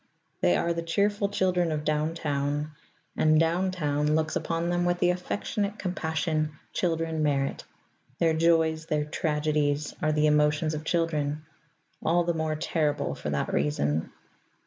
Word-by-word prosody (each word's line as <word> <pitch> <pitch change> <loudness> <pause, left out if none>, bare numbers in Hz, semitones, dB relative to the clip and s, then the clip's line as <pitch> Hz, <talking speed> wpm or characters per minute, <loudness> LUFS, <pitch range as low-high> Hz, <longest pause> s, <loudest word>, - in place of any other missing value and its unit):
They 85 - +4
are 170 - 0
the 170 - -3
cheerful 200 +4 +1
children 180 -4 +1
of 150 -1 -2
Down 155 +2 0
Town, 145 -1 -1 0.4
and 155 0 +4
Down 170 +3 +2
Town 150 -4 0
looks 155 0 0
upon 170 +1 -1
them 175 0 +1
with 175 0 +1
the 175 0 +3
affectionate 200 +3 -2
compassion 160 -4 -1 0.2
children 165 -2 -1
merit. 140 -2 0 0.5
Their 165 -2 +3
joys, 160 -1 +2
their 150 -2 0
tragedies, 150 -1 0
are 155 - +2
the 150 0 +2
emotions 150 +1 +3
of 155 0 -5
children 155 -3 -1 0.6
all 175 +2 +3
the 170 0 0
more 160 -1 -1
terrible 155 -2 -1
for - - -5
that - - -1
reason. 75 +2 0
160 Hz, 145 wpm, -27 LUFS, 150-170 Hz, 0.6 s, They